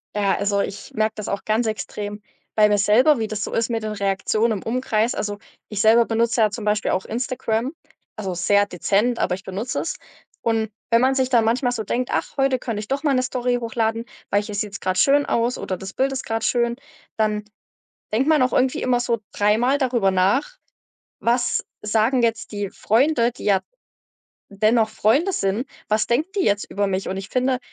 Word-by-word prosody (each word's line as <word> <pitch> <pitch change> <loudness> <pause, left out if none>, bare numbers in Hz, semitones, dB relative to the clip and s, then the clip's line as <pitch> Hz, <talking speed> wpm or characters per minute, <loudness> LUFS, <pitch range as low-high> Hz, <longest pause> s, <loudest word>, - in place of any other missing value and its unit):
Ja, 200 -2 +2
also, 200 0 0
ich 200 - -6
merke 215 0 0
das 210 - -5
auch 200 - -3
ganz 220 +2 +1
extrem 210 -1 -4 0.3
bei 215 -1 +6
mir 210 0 +2
selber, 240 +9 +4
wie 220 -1 -1
das 215 0 -3
so - - -7
ist 230 +1 0
mit 230 -1 -1
den 215 - -3
Reaktionen 200 +3 0
im - - -13
Umkreis. 230 -1 0
Also, 205 -1 -3 0.3
ich 210 - -4
selber 225 +3 +5
benutze 230 +1 +1
ja 215 -1 +4
zum 210 0 -6
Beispiel 210 0 +1
auch 185 - -1
Instagram, 245 +2 -2 0.4
also, 195 -4 -3
sehr 200 +4 +3
dezent, 205 +5 0
aber 180 - +1
ich 195 - -12
benutze 200 +6 -3
es. - - -3 0.5
Und 225 -2 0 0.2
wenn 230 0 +5
man 265 +1 +3
sich 260 -1 +1
dann 235 -4 +3
manchmal 245 +2 +1
so 220 -3 -3
denkt: 245 +5 -2
„Ach, - - -2
heute 270 -2 +2
könnte 225 -5 -3
ich 215 - -10
doch 280 +2 -1
mal 290 -3 +2
'ne 255 - +2
Story 250 -1 -1
hochladen, 225 0 -1 0.3
weil 205 - +2
hier 210 0 -7
sieht's 200 -1 -4
grad 185 0 -1
schön 285 +6 +4
aus“, 235 +1 0
oder 185 - -4
das 190 +2 -8
Bild 270 +1 +1
ist 270 0 -4
grad 225 0 -2
schön, 235 -1 +1 0.4
dann 210 -1 0 0.7
denkt 250 +5 +2
man 310 -4 +4
auch 255 - +1
irgendwie 255 0 +1
immer 250 -1 +2
so 235 -2 -1
dreimal 225 +7 +2
darüber 240 -8 +2
nach: 200 - +1 0.6
„Was 240 +1 +1 0.2
sagen 225 +4 +2
jetzt 230 0 0
die 205 -2 -3
Freunde?“, 240 +1 +2
die 245 - -12
ja 195 -2 +3 0.9
dennoch 215 +3 +2
Freunde 265 - +2
sind, 200 +7 -1 0.2
„Was 215 +1 +2
denken 285 +9 +1
die 375 - +2
jetzt 205 0 0
über 200 0 0
mich?“ 190 0 -2
Und 190 - -3
ich 195 0 -6
finde 255 0 0
225 Hz, 205 wpm, -22 LUFS, 205-250 Hz, 0.9 s, bei